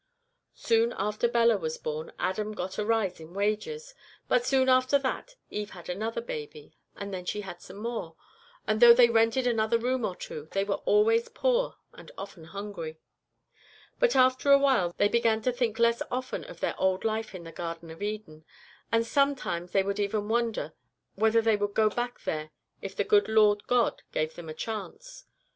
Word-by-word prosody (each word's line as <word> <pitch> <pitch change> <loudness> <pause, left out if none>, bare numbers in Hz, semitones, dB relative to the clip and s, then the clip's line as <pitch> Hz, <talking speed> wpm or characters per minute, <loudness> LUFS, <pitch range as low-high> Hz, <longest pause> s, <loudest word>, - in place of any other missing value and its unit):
"Soon 230 +1 +2
after 210 +4 0
Bella 235 -2 +3
was 160 -2 -3
born 155 +1 -5
Adam 210 +3 -2
got 190 0 -5
a - - +1
rise 220 -6 +1
in 160 +3 -12
wages, 215 - -2 0.3
but 250 -1 +3
soon 265 -1 +3
after 255 +2 +4
that 280 - -4 0.2
Eve 210 0 -4
had 175 -1 -11
another 220 +5 -2
baby; 150 -8 -8 0.2
and 200 0 -6
then 185 -1 -4
she 210 +3 -3
had 175 -3 -9
some 195 - -11
more, 215 -7 -5 0.5
and 215 +2 0
though 235 -1 +10
they 240 -1 +6
rented 230 +3 +3
another 230 -1 +2
room 250 +1 -1
or 190 -4 -2
two 155 -3 -8
they 195 - +1
were 200 0 -2
always 455 +3 +3
poor - - 0 0.2
and - - -13
often 195 -4 -9
hungry. 170 -3 -7 1.0
But - - +3
after 260 +2 +4
a 280 - +9
while 265 -11 +2
they 205 - +4
began 225 0 +2
to 255 - +2
think 240 -3 -1
less 235 0 +3
often 255 - -4
of - - -12
their - - 0
old 190 +1 +1
life 220 -2 -2
in 175 - -8
the 165 - -9
Garden 165 -1 -6
of 165 - -12
Eden, 205 -7 -5 0.5
and 230 0 +2
sometimes 245 -11 0
they 195 - +3
would 200 +1 -2
even 205 +1 -1
wonder 230 0 -1 0.4
whether 225 +1 +3
they 220 -2 +3
would 205 0 -2
go 215 -1 +4
back 245 +1 -3
there 155 0 -3 0.3
if 195 -1 -7
the - - +1
good 205 +1 +3
Lord 210 -2 +4
God 245 -2 +2
gave 155 +1 -1
them 170 -2 -10
the 155 - -7
chance. - - -7
215 Hz, 190 wpm, -28 LUFS, 190-240 Hz, 1.0 s, though